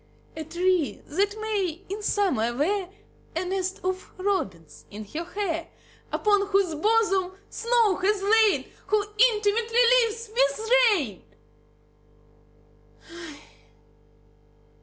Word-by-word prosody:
A 320 - -5
tree 345 - 0
that 405 +6 -1
may 395 -5 -2
in 400 +3 -5
summer 345 - 0
wear 370 +5 0 0.5
A 345 +3 -1
nest 375 0 -3
of 370 +1 -3
robins 260 - -3
in 210 +1 -8
her 310 +11 -5
hair; 340 -3 -3 0.4
Upon 410 -1 +2
whose 390 -4 +1
bosom 390 +1 +1 0.2
snow 460 -4 +2
has 395 +1 0
lain; 435 0 +3 0.2
Who 420 -1 +1
intimately 460 +1 +3 0.2
lives 455 -1 -3
with 475 -2 0 0.2
rain. 275 - -1
395 Hz, 100 wpm, -25 LUFS, 345-430 Hz, 0.5 s, lain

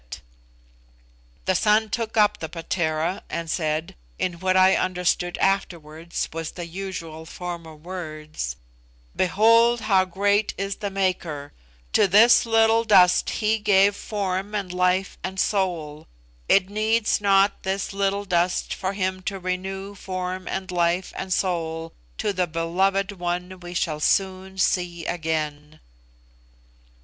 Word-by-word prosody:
The 190 - +2
son 210 +3 +2
took 230 0 -3
up 210 -1 +4
the 160 - -5
'patera' 165 +1 -2
and 165 -1 -3
said 155 -1 -1 0.2
(in 175 -2 -2
what 185 +1 +2
I 185 0 +6
understood 180 -1 0
afterwards 170 -4 -2
was 165 -1 -4
the 175 - -6
usual 170 -3 -7
form 175 -1 -6
of 155 0 -14
words), 155 - -5 0.6
"Behold 230 +5 +4
how 190 -2 +3
great 200 +3 +1
is 195 0 -3
the 205 -1 -3
Maker! 180 -7 -2 0.4
To - - +5
this 220 +5 +6
little 225 0 +4
dust 185 -5 +5
He 220 0 0
gave 200 -1 +4
form 200 0 -3
and 195 -3 -3
life 180 +1 +1
and 190 0 -4
soul. 170 -7 -1 0.4
It 190 -1 +5
needs 215 +2 +1
not 195 0 +3
this 195 +1 -2
little 200 +1 0
dust 180 -1 0
for 190 +1 -3
Him 185 -1 -2
to 195 - -6
renew 190 +2 -4
form 185 -1 -5
and 190 0 -4
life 175 +1 0
and 190 - -5
soul 165 -3 -1 0.2
to 205 - -1
the 180 -1 0
beloved 190 +5 0
one 180 0 -4
we 175 0 -9
shall 155 -3 -1
soon 190 +3 0
see 175 -3 0
again." 155 -2 -3
185 Hz, 135 wpm, -24 LUFS, 170-195 Hz, 0.6 s, I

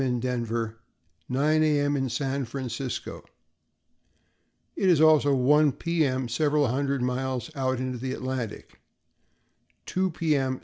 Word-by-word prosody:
in 125 -2 0
Denver 120 -2 -1 0.6
and 130 - -3
9 155 +3 +3
A. 150 -2 +3
M. 145 0 +1
in 135 -2 -1
San 135 +3 -2
Francisco; 125 0 -5 1.5
it 190 - +2
is 170 -4 +5
also 155 -2 +5
1 145 +3 +4
P. 170 +2 0
M. 130 -2 0
several 145 +4 +1
hundred 140 +1 -1
miles 125 +1 -2
out 130 -1 0
into 130 -1 -3
the 130 +1 -3
Atlantic; 130 -5 -5 1.0
2 185 +1 0
P. 160 -2 0
M. 130 -2 -1
135 Hz, 140 wpm, -26 LUFS, 125-150 Hz, 1.5 s, is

